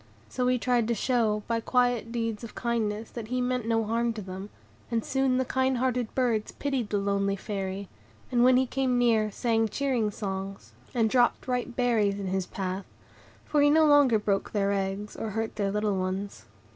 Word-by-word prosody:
So 250 -1 -1
he 250 0 +3
tried 245 -2 +1
to 235 - +1
show, 220 -2 +1
by 230 -1 0
quiet 245 -1 +1
deeds 230 -2 -2
of 230 - -9
kindness, 225 -2 -2
that 230 -3 -6
he 250 +2 -1
meant 250 -2 -1
no 225 -1 +2
harm 230 +2 0
to 220 - -6
them; 190 +2 -7 0.4
and 230 -2 -1
soon 265 -1 +1
the 260 - +1
kind 260 0 +1
hearted 250 -2 -1
birds 235 -5 0
pitied 270 -6 -2
the 205 - 0
lonely 200 0 0
Fairy, 195 -1 -4 0.4
and 240 -1 +3
when 255 0 +6
he 260 - +3
came 260 -1 0
near 225 -3 +3
sang 225 +1 +1
cheering 255 -4 0
songs, 195 - -5 0.2
and 230 -2 +3
dropped 245 +3 +2
ripe 250 -1 -2
berries 220 -5 +2
in 200 - -4
his 190 -1 -1
path, 190 0 -4 0.6
for 295 - +2
he 290 - +6
no 315 +1 +5
longer 290 -6 +5
broke 200 -2 -1
their 200 -1 +1
eggs, 195 +1 -2
or 225 - -4
hurt 220 +2 -3
their 200 -2 0
little 210 0 0
ones. 185 - -3
225 Hz, 195 wpm, -28 LUFS, 200-250 Hz, 0.6 s, when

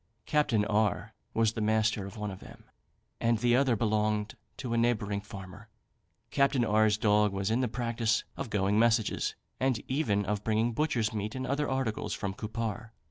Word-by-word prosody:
Capt. 150 -2 +1 0.2
R 105 -2 0 0.2
was 115 -1 +3
the 115 - -3
master 110 -2 +1
of 100 - -10
one 105 -1 -3
of 95 - -9
them, - - -13 0.6
and 115 0 +2
the 120 +2 +3
other 130 -2 +3
belonged 105 -1 0 0.2
to 120 -2 -4
a - - +1
neighbouring 105 -4 0
farmer. 100 0 -10 0.6
Capt. 140 +4 +3
R 110 0 +4
's 105 - +1
dog 105 -1 +3
was 100 +2 -1
in 115 - +2
the 125 - +1
practice 115 -1 0
of 135 - -5
going 105 0 +1
messages, 115 -1 +2 0.2
and 130 -3 +1
even 110 -8 0
of 105 +1 -2
bringing 110 +2 +1
butchers' 115 -6 0
meat 105 +1 -3
and 130 0 -3
other 145 +2 -1
articles 130 -5 -1
from 100 -2 -3
Cupar. 115 +2 -4
110 Hz, 180 wpm, -30 LUFS, 105-120 Hz, 0.6 s, R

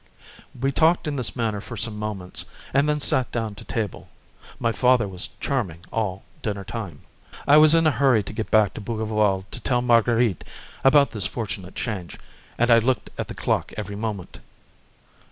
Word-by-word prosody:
We 135 +2 +1
talked 165 +3 +3
in 150 - -2
this 120 -6 -1
manner 110 -4 -1
for 115 +1 -8
some 110 +2 -2
moments, 105 -4 -4 0.3
and 140 +2 +3
then 150 0 +1
sat 130 -3 +2
down 115 -3 -2
to 100 - -12
table. 110 -5 -4 0.5
My 115 - +1
father 125 -2 +3
was 95 -1 -3
charming 90 - -2
all 95 -4 -2 0.2
dinner 100 -2 -3
time. 100 -8 -7 0.5
I 145 - +7
was 155 +1 +7
in 165 0 +4
a 155 - +5
hurry 130 -4 +3
to 105 - -8
get 110 0 -4
back 110 -2 +4
to - - -7
Bougival 105 -3 0
to - - -6
tell 125 -1 0
Marguerite 115 -4 +3 0.4
about 140 +1 +5
this 100 -3 0
fortunate 100 -4 -5
change, 95 -7 -4 0.4
and 120 +1 +3
I 115 - +8
looked 120 -1 -1
at - - -2
the - - -7
clock - - -1
every 100 +1 -5
moment. 105 -4 -5
115 Hz, 180 wpm, -24 LUFS, 100-125 Hz, 0.5 s, I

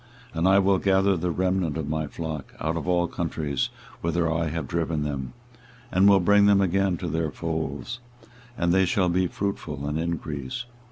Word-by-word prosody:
24:023:003 - - -10
And 85 - +3
I 95 +1 +6
will 100 0 +4
gather 95 0 +3
the 90 +1 -1
remnant 90 -3 0
of 80 -3 -3
my 80 0 -1
flock 75 -2 -6
out 80 +2 -1
of 80 - -4
all 90 -1 +3
countries 80 -5 -2 0.3
whither 85 0 0
I 80 0 0
have 80 -2 -3
driven 80 -3 -1
them, 70 -3 -4 0.6
and 95 +2 +5
will 100 -1 +6
bring 100 +2 +5
them 100 -1 +5
again 95 -1 +2
to - - -4
their 80 -1 -1
folds; 80 - -4 0.6
and 85 0 +2
they 95 0 +4
shall 90 0 +2
be 90 +1 +2
fruitful 80 -8 -4
and 75 +2 -1
increase. 80 - -3
85 Hz, 185 wpm, -25 LUFS, 80-95 Hz, 0.6 s, I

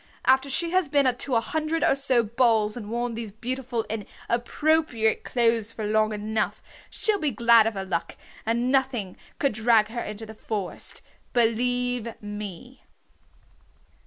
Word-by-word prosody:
After 265 +1 +4
she 335 +5 +1
has 370 -5 +2
been 275 -3 +3
to 250 +1 -1
a - - +5
hundred 315 +6 -1
or - - +4
so 265 -3 +3
balls 220 -2 +2
and 215 -4 -7
worn 240 +1 -2
these 225 -2 -5
beautiful 245 +1 -3
and 215 -2 -5 0.2
appropriate 245 -1 +1
clothes 230 -2 0
long 215 0 +1
enough 215 +1 -2 0.3
she'll 425 -2 0
be 305 - +1
glad 235 -2 +5
of 225 - -2
her 195 0 -4
luck, 170 -3 -3 0.3
and 235 +3 0
nothing 260 -8 0 0.2
could 275 -5 +1
drag 220 0 +3
her 235 +1 -4
into 210 +1 -6
the 220 - -10
forest. 210 -4 -4 0.3
Believe 245 0 0
me!" 205 +3 -8
235 Hz, 150 wpm, -25 LUFS, 215-260 Hz, 0.3 s, a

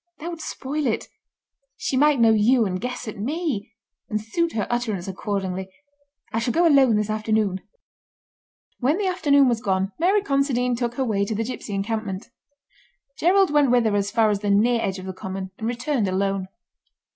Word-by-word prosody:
That 335 +3 -6
would 335 -2 -7
spoil 290 0 -3
it. 220 - -2 0.7
She - - -2
might 290 0 +4
know 225 -1 +6
you 225 +3 +4
and 185 -2 -3
guess 250 -1 -4
at 215 - -6
me, 275 - -2 0.4
and 215 - -1
suit 325 +11 -1
her 215 - -1
utterance 220 -7 -2
accordingly. 190 -1 -3 0.6
I 225 - +1
shall 235 +1 -1
go 345 +1 +4
alone 270 -7 +5
this 210 0 0
afternoon." 215 -3 0 1.2
When 275 +6 +2
the 410 - -1
afternoon 295 -7 +3
was 235 -2 +1
gone 190 -1 0
Mary 385 +4 +3
Considine 275 -5 +1
took 240 0 -2
her 265 - 0
way 205 -4 0
to 215 - -3
the 225 - -1
gipsy 225 -3 -5
encampment. 205 -1 -3 0.9
Gerald 375 +1 +4
went 295 -2 +4
with 240 -1 +3
her 215 -2 +2
as 200 0 0
far 220 0 +3
as 205 - 0
the 205 0 -2
near 225 +4 +3
edge 190 -2 -2
of 185 - -8
the 190 - -5
common, 190 0 -6
and 220 - -3
returned 240 -1 -1
alone. 195 0 -1
225 Hz, 185 wpm, -23 LUFS, 200-275 Hz, 1.2 s, know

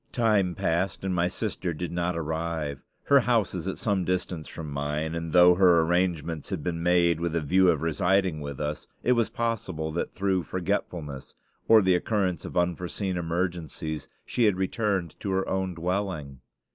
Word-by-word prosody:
Time 105 -7 +2
passed, 85 +3 -1
and 95 - 0
my 90 0 +2
sister 90 -3 -3
did 90 +3 -4
not 85 0 -1
arrive. 80 -3 -3 0.2
Her 140 -1 +5
house 120 -6 +1
is 90 0 -4
at 95 - -3
some 100 -4 0
distance 90 -3 -2
from 80 -3 -7
mine, 75 +3 -2
and 80 -1 -4
though 90 +1 +7
her 90 -2 +5
arrangements 85 -2 0
had 95 -7 -3
been 85 -2 -2
made 85 -1 +3
with 85 -1 -2
a - - +2
view 90 +5 +4
of 80 -3 +1
residing 90 0 +1
with 70 -2 -6
us, 75 0 -3 0.2
it 125 - +2
was 120 -3 +2
possible 95 -9 -2
that 85 - -2
through 95 -2 0
forgetfulness, 85 -6 -4 0.3
or 110 -2 +7
the 95 0 +4
occurrence 90 -2 0
of - - -6
unforeseen 90 +2 -1
emergencies, 85 -3 -3 0.2
she 120 - +1
had 105 -3 +4
returned 95 -3 -1
to 100 - -4
her 95 0 0
own 95 -2 -1
dwelling. 85 -6 -3
90 Hz, 175 wpm, -27 LUFS, 80-95 Hz, 0.3 s, though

